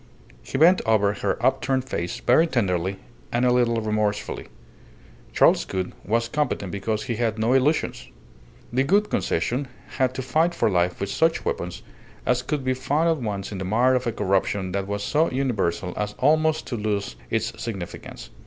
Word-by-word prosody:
He - - -4
bent 170 +6 +6
over 105 -2 +3
her 100 -1 -1
upturned 130 0 +1
face 85 -7 -3
very 160 +7 +4
tenderly 95 - 0 0.3
and 120 +1 +1
a 125 - +4
little 120 -2 +2
remorsefully. 105 -1 -1 0.8
Charles - - +4
Gould 95 -1 -3
was 115 +3 0
competent 120 -8 -1
because 105 +2 -2
he 120 -4 -3
had 115 -2 0
no 110 +3 +2
illusions. 135 +4 +1 0.7
The 130 +2 +3
Gould 205 +8 +2
Concession 130 +3 0 0.3
had 130 -1 +2
to 130 - -3
fight 160 +7 +1
for 110 - +2
life 90 -1 +1
with 100 0 -3
such 165 +8 +1
weapons 90 0 -3 0.4
as 125 0 +2
could 135 +2 -2
be 130 0 +1
found 140 +6 +1
at 165 - +2
once 100 -2 -3
in 100 - -5
the - - -3
mire 120 +7 +3
of 125 -1 0
a - - +1
corruption 95 -1 0
that 95 0 -2
was 100 0 -3
so 155 +9 +2
universal 100 -10 -1
as 105 0 -3
almost 155 +3 +2
to 125 - -4
lose 105 -1 -2
its - - -2
significance. 100 -7 -7
115 Hz, 175 wpm, -24 LUFS, 100-130 Hz, 0.8 s, bent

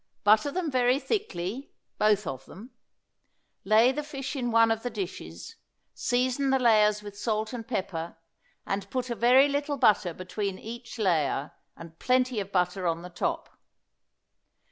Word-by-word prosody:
Butter 215 +7 +4
them 335 0 -2
very 250 0 +3
thickly, 265 - -4 0.2
both 210 -1 +3
of 135 0 -6
them. 225 +8 -12 0.9
Lay 220 +5 +5
the 300 - -3
fish 275 -2 -6
in 245 -3 -2
one 230 0 +4
of 225 0 -1
the 245 - -3
dishes, 175 - -7 0.4
season 255 - 0
the 265 - +4
layers 210 -4 +3
with 205 -1 -9
salt 215 +2 -2
and 230 -2 -6
pepper, 175 -8 -4 0.5
and 195 0 -3
put 255 0 -3
a - - -1
very 250 +5 +5
little 285 0 -2
butter 210 -7 +3
between 190 +1 -4
each 235 +3 -9
layer, 160 -8 0 0.3
and 165 0 -12
plenty 255 -2 +1
of 200 0 -5
butter 180 0 0
on 165 0 -1
the 180 - -8
top. 175 - -3
220 Hz, 155 wpm, -27 LUFS, 190-255 Hz, 0.9 s, Lay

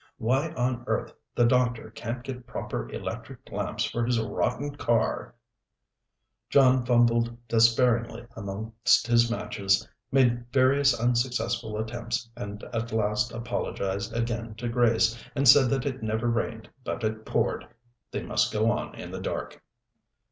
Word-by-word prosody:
Why 130 +7 +1
on 125 -3 -1
earth - - -1 0.2
the 120 - +4
doctor 120 -2 +1
can't 120 +2 -5
get 125 -2 -7
proper - - -4
electric - - -7
lamps - - -2
for 120 - -2
his 120 0 +1
rotten 120 +6 -1
car 120 -3 0 0.6
" - - -56
John 130 -2 +5
fumbled 120 -1 +2
despairingly 115 0 +3
amongst 110 +3 +1
his 120 0 +4
matches, 100 -4 0 0.2
made 120 -2 +2
various 135 0 +4
unsuccessful 120 -2 0
attempts, 115 +1 -3
and 105 0 -7
at 115 0 -2
last 110 +2 0
apologized 110 -3 -3
again 115 -1 -2
to 120 +2 -4
Grace, 115 -1 +2
and 140 -1 +2
said 135 0 +8
that 135 -1 0
it 130 -3 -3
never 110 +2 -1
rained 115 -1 -2 0.2
but 120 - -4
it 110 0 -2
poured. - - -1 0.4
They - - -4
must - - +1
go 110 +2 +2
on - - -3
in - - -8
the - - -5
dark. - - -4
120 Hz, 140 wpm, -27 LUFS, 110-125 Hz, 0.6 s, said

